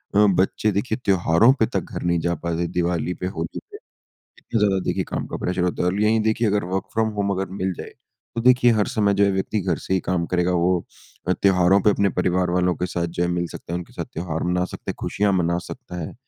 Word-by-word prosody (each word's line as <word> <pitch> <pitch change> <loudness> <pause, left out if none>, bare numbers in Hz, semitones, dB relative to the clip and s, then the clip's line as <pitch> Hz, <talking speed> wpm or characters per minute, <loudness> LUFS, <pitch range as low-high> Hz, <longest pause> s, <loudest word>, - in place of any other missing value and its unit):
अ, 105 0 +6
बच्चे 95 +3 +2
देखिए 110 +4 -1
त्योहारों 95 +5 +4
पे 110 - +4
तक - - +2
घर - - -4
नहीं 85 -1 +1
जा 85 0 0
पाते 85 0 -1
दीवाली 90 0 0
पे, 90 - -4
होली 80 -3 -4
पे, 410 - -8 0.6
इतनी 115 - -3
ज़्यादा 100 -2 +3
देखिए - - -1
काम - - -3
का - - -5
प्रेशर 90 0 -2
होता 90 0 0
है। - - +1
और 100 +3 -1
यहीं 110 +1 +3
देखिए 110 +1 +1
अगर 105 -2 +1
वर्क 95 +2 -2
फ्रॉम 110 0 +1
होम 100 0 +1
अगर 95 0 -2
मिल 95 0 0
जाए, - - -7 0.4
तो 115 - -1
देखिए 125 -1 +5
हर 105 -2 +2
समय 105 -5 +2
जो 100 0 +4
है 100 - +3
व्यक्ति 95 +2 -1
घर 90 -3 -1
से 95 - 0
ही 95 - +2
काम 85 -2 -1
करेगा, 90 0 +1
वो 90 0 +1 0.4
अ, - - +4
त्योहारों 95 0 +4
पे 105 - +5
अपने 100 0 +2
परिवार 90 0 +1
वालों 90 0 +2
के 90 - -1
साथ 85 -1 -2
जो 85 +1 -3
है 90 - +1
मिल 85 0 -1
सकता 85 - -8
है, 90 - 0
उनके 90 - -10
साथ - - -4
त्योहार 80 -1 -3
मना 90 +1 +1
सकते, - - -5
खुशियाँ 100 0 -1
मना 85 -1 +1
सकता 125 -9 -8
है 80 - -6
90 Hz, 245 wpm, -23 LUFS, 85-105 Hz, 0.6 s, अ